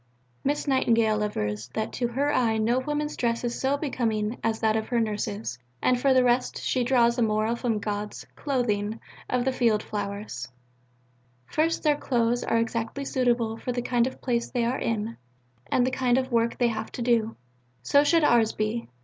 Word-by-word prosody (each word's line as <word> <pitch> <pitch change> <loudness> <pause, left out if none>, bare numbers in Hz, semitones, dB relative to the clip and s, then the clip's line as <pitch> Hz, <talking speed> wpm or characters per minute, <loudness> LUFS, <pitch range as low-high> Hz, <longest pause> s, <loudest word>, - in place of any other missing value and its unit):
Miss 290 +2 -1
Nightingale 230 -5 +3
avers 105 - -2
that 220 - -2
to 245 - -1
her 280 +5 0
eye 225 -3 +2
no 230 +3 +2
women's 295 +2 -2
dress 235 -1 -1
was 240 -1 -2
so 270 +2 +2
becoming 230 -6 -1
as 225 -1 0
that 220 -1 +2
of 220 0 -1
her 240 - +1
Nurses, 210 - -2 0.2
and 250 -1 +2
for 275 - +4
the 260 -1 +5
rest 245 +1 +1
she 255 - 0
draws 240 -1 +3
a - - +2
moral 215 +1 +1
from 235 -2 -1
God's 210 0 -4
"clothing" 225 -6 -1 0.3
of 250 -1 0
the 265 - +2
field 230 -4 +2
flowers: 200 - -5 1.0
First: 320 - 0
their 300 -2 +3
"clothes" 240 -3 0
are 230 - +1
exactly 230 +4 -2
suitable 240 -4 +1
for 250 - -4
the 245 0 -2
kind 245 -1 +2
of 260 - -8
place 235 -2 0
they 240 -2 0
are 250 +3 -1
in 225 0 -2 0.5
and 245 - +2
the 260 - 0
kind 250 -1 +2
of 260 0 -1
work 230 0 +1
they 240 -1 +3
have 220 -1 -4
to 240 - -3
do. 230 -2 +1 0.5
So 285 - +4
should 330 +2 +3
ours 235 -5 +4
be. 215 +2 -2
235 Hz, 190 wpm, -26 LUFS, 220-255 Hz, 1.0 s, the